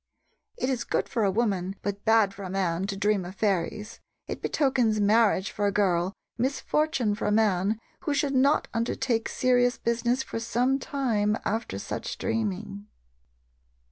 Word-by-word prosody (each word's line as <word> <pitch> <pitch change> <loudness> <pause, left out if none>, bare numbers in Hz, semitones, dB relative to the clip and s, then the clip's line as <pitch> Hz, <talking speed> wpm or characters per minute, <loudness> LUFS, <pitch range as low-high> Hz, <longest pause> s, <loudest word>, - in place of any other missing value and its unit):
It 255 - -1
is 255 -3 -1
good - - -1
for 230 - -1
a 200 - +3
woman, 195 -3 0
but 200 0 -3
bad 220 -3 +4
for 200 - -11
a 190 - -5
man, 185 -1 -1
to 200 -1 -4
dream 205 -1 +1
of 180 +2 -8
fairies. 205 +2 -1 0.3
It - - -6
betokens 250 -7 +1
marriage 210 -2 +3
for 205 0 0
a - - +1
girl, 185 -2 +1 0.3
misfortune 275 -2 0
for 205 - -3
a - - +2
man, 210 -1 +2 0.3
who 295 -4 +1
should 285 -1 0
not 275 +3 +3
undertake 230 0 -1
serious 245 -1 +2
business 235 +2 0
for - - -5
some 245 +4 +1
time 220 -7 0
after 225 +2 -2
such - - -5
dreaming. 205 -2 -3
215 Hz, 160 wpm, -27 LUFS, 200-245 Hz, 0.3 s, bad